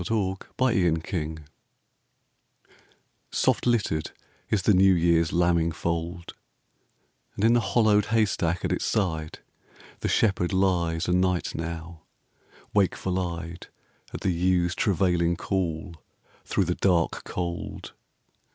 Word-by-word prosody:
Dante 95 -1 0 0.2
Gabriel 115 -10 +3
Rossetti - - -3
Spring 80 -3 -4 1.8
SOFT - - +1
LITTERED 105 -10 +1 0.4
is 100 -4 +1
the 105 - +4
new 95 0 +5
year's 85 -1 +2
lambing 85 -1 +2
fold, 85 +1 -4 1.0
And 105 - 0
in 115 - +5
the 120 - +4
hollowed 110 -3 +3
haystack 100 -6 0
at - - -1
its - - -1
side 80 -7 -1 0.6
The - - -2
shepherd 95 -4 +1
lies 90 -3 +1
o' - - +1
night 90 0 +1
now, 85 0 -6 0.7
wakeful 95 -2 +1
eyed 85 -1 -5 0.4
At - - -7
the 95 - +1
ewes' 90 0 +1
travailing 90 -3 +1
call 85 -3 -3 0.5
through 95 - 0
the 90 - 0
dark 85 -3 +1
cold. 85 -1 -5
90 Hz, 120 wpm, -26 LUFS, 85-95 Hz, 1.8 s, new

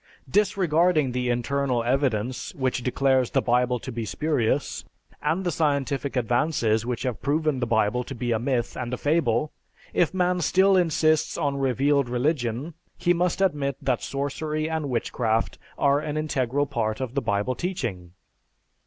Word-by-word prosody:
Disregarding 175 -7 +2
the 125 0 -1
internal 125 0 0
evidence 125 -2 -1
which 130 -2 -1
declares 130 0 +2
the - - +2
Bible 125 0 +2
to 130 - -7
be 115 -1 -4
spurious, 135 +2 -1 0.4
and 160 +6 0
the 175 - 0
scientific 140 -3 0
advances 120 -2 +1
which 125 -2 -2
have 125 -4 -3
proven 150 -1 0
the 120 - -1
Bible 115 +2 +1
to 135 - -7
be 120 0 -2
a 110 - +1
myth 120 -1 -1
and 125 0 -3
a - - -10
fable, 150 -2 +1 0.4
if 175 - +2
man 180 -1 +1
still 190 +5 +4
insists 155 -3 +2
on 140 -1 -1
"revealed 135 0 +2
religion" 125 +2 -1 0.2
he 175 0 +2
must 175 +2 0
admit 145 -8 +1
that 125 -3 0
sorcery 150 +3 -2
and 160 -3 -2
witchcraft 115 -2 -1 0.2
are 140 0 +3
an 150 0 -4
integral 145 -2 0
part 110 -5 -2
of 130 -2 -4
the 140 - 0
Bible 105 +2 0
teaching. 120 - -4
135 Hz, 155 wpm, -25 LUFS, 120-155 Hz, 0.4 s, still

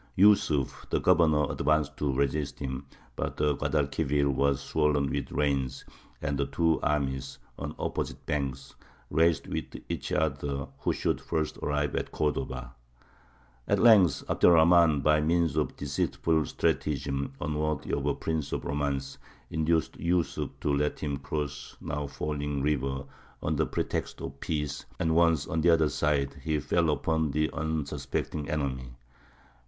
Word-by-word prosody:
Yūsuf, 90 -9 +3
the - - +1
governor, 80 -5 +4
advanced 75 -3 +1
to 75 -2 0
resist 70 +1 -1
him, 65 0 -5 0.3
but - - -3
the 75 -1 +2
Guadalquivir 70 -1 +1
was 70 0 +2
swollen 75 -2 +1
with 70 - -3
rains, 70 -3 -1 0.4
and 70 0 -1
the 70 - +1
two 80 -1 +2
armies, 65 -2 -1 0.2
on 75 +1 -5
opposite - - -3
banks, 70 -2 -3 0.4
raced 80 +2 +3
with - - -3 0.2
each - - -4
other 70 -2 -1
who - - 0
should - - -1
first 80 -1 -2
arrive 75 -1 0
at - - -2
Cordova. 65 -4 -2 0.9
At - - +3
length 105 - +6
Abd - - +2
er - - +9
Rahmān, 80 -3 +5
by 75 0 +4
means 80 -1 +2
of 75 -1 +1
a - - -18
deceitful 75 +2 0
stratagem, 70 -2 -1
unworthy 75 -1 -2
of 70 0 0
a 70 - +1
prince 80 -3 -2
of - - -3
romance, 70 -2 -2 0.3
induced 80 +1 0
Yūsuf 85 0 0
to 75 - +1
let 75 +1 0
him 70 -2 -1
cross 70 0 -5
the - - -8
now 75 0 -2
falling 75 -1 -3
river 70 -2 0 0.4
under 80 0 +1
pretext - - -3
of 70 +1 -7
peace; 75 -3 -3
and 80 -1 +1
once 80 -3 +4
on 80 - -1
the 85 - +4
other 80 -2 +4
side, 70 -1 0
he 80 -1 0
fell 80 +3 +1
upon 80 +1 +1
the 75 +2 0
unsuspecting 80 -1 -3
enemy. 65 -5 -3
75 Hz, 150 wpm, -29 LUFS, 70-80 Hz, 0.9 s, er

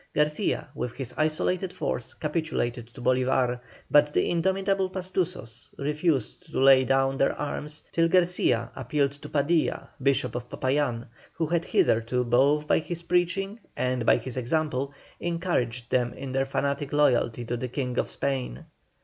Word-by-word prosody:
Garcia, 150 +6 +1
with 125 -4 -4
his 130 -2 -5
isolated 170 +4 0
force, - - -3
capitulated 150 -7 -2
to 120 - -15
Bolívar, 130 -1 +2 0.3
but 150 0 +5
the - - +1
indomitable 190 +2 +1
Pastusos 180 - -4
refused 150 -3 -1
to - - -1
lay 135 0 +7
down 135 +1 +2
their 135 - +2
arms 150 +1 -4
till 165 0 +3
Garcia 170 -9 +2
appealed 140 +2 0
to 145 +1 -11
Padilla, 155 +3 0
Bishop 135 0 +1
of 120 0 -5
Popayán, 130 -3 0 0.3
who 165 - -1
had 170 +2 0
hitherto, 115 +3 +2
both 135 +5 +3
by - - +4
his 170 +1 -6
preaching 185 +5 0 0.2
and 125 -1 0
by - - +5
his 130 -1 -6
example, 140 +1 -1 0.3
encouraged 130 -9 -2
them 120 -1 +1
in 135 -1 -6
their 135 +1 0
fanatic 140 +1 -1
loyalty 120 -5 +2
to 120 - -2
the 125 +1 -3
King 125 -1 -2
of - - -1
Spain. 130 - -3
140 Hz, 150 wpm, -27 LUFS, 125-165 Hz, 0.3 s, lay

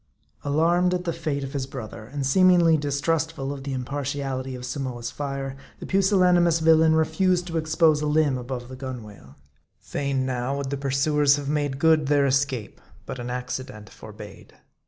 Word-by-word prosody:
Alarmed 170 +5 +2
at 180 - -3
the 170 -2 -2
fate 155 -4 -3
of 135 - -6
his 135 -2 -3
brother, 115 -4 -8
and 140 +3 -4
seemingly 175 +2 +5
distrustful 145 0 -1
of 135 -1 -8
the 140 - -4
impartiality 135 0 -3
of 125 0 -7
Samoa's 125 -2 -4
fire, 135 -2 -4 0.2
the - - -8
pusillani 190 -2 +3
mous 170 -1 +3
villain 160 0 +5
refused 175 +3 +2
to 165 -2 -3
expose 155 -1 +2
a 150 - -1
limb 150 -2 +2
above 125 -1 -5
the 130 - -9
gunwale. 110 - -9 0.4
Fain 140 -2 -2
now 130 +1 -2
would 140 -1 -4
the - - 0
pursuers 140 +1 +2
have 145 -1 -4
made 145 -2 -1
good 155 -1 +3
their 145 -1 +3
escape; 135 -4 -1 0.2
but 130 - -6
an 120 0 -5
accident 125 -3 -6
forbade. - - -12
140 Hz, 170 wpm, -24 LUFS, 130-160 Hz, 0.4 s, seemingly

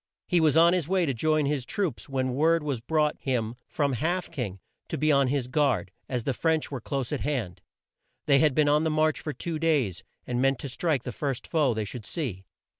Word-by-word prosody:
He 175 -2 +2
was 155 -1 +4
on 170 +1 +6
his 175 -5 0
way 185 -1 +2
to 140 - 0
join 155 +5 +1
his 140 -2 0
troops 170 - -3
when 130 -2 -1
word 160 +4 +3
was 140 -6 -2
brought 150 +3 +1
him 120 -4 -1
from 140 -3 0
Half 170 +10 -1
King 115 - -4 0.3
to - - -3
be 155 +2 +2
on 140 -2 +4
his 130 -2 0
guard, 125 - +1 0.2
as 125 -3 -2
the 135 - 0
French 160 +5 0
were 135 -3 -4
close 135 0 -3
at 150 - -2
hand. 110 -12 -2 0.6
They 140 -2 +5
had 150 -3 +3
been 150 -1 +3
on 150 +1 +3
the 160 - +1
march 155 0 +2
for 155 - -4
two 155 +4 -4
days, 145 - +1 0.2
and 125 0 -1
meant 135 0 +3
to 140 - -4
strike 145 -1 0
the 125 - -4
first 135 -3 -3
foe 145 -8 +1
they 110 -1 -2
should 105 +1 -7
see. 110 - -4
140 Hz, 225 wpm, -27 LUFS, 125-155 Hz, 0.6 s, on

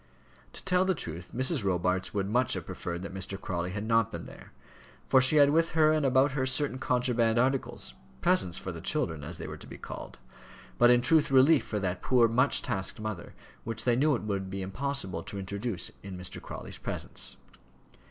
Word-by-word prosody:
To - - -6
tell 180 -1 +3
the 190 -1 +1
truth 85 - -6
Mrs. 130 +1 +1
Robarts 90 0 0
would 100 -2 -1
much 120 +4 +1
have - - -3
preferred 85 0 -5
that 95 - -7
Mr. 95 +1 -4
Crawley 85 -2 -3
had 100 +2 -4
not 115 0 +2
been - - -6
there, - - -13 0.6
for 130 - +5
she 130 +4 +6
had 145 -1 +6
with 165 +2 +2
her 155 -1 +6
and 155 -1 +1
about 135 +1 +4
her 135 -1 -1
certain 130 0 0
contraband 120 -3 +1
articles, 130 +2 0 0.3
presents 135 - +2
for 95 - -5
the 85 -1 -8
children, 90 - -1
as 80 +3 -5
they - - -7
were - - -7
to - - -12
be - - -9
called, - - -9 0.6
but 120 - +7
in 120 0 +5
truth 160 +3 +4
relief 135 +3 +5
for 105 - -2
that 95 -2 -2
poor, 125 -3 +4
much 125 +5 +2
tasked 105 -7 -2
mother, 110 -5 -6 0.3
which 115 0 -4
they 120 -2 +3
knew 145 +3 +3
it 115 - -5
would 100 -2 -3
be 95 0 -4
impossible 95 -3 -2
to 100 - -8
introduce 100 0 -4
in 95 -2 -8
Mr. 90 0 -6
Crawley's - - -8
presence. - - -3
115 Hz, 200 wpm, -29 LUFS, 95-135 Hz, 0.6 s, but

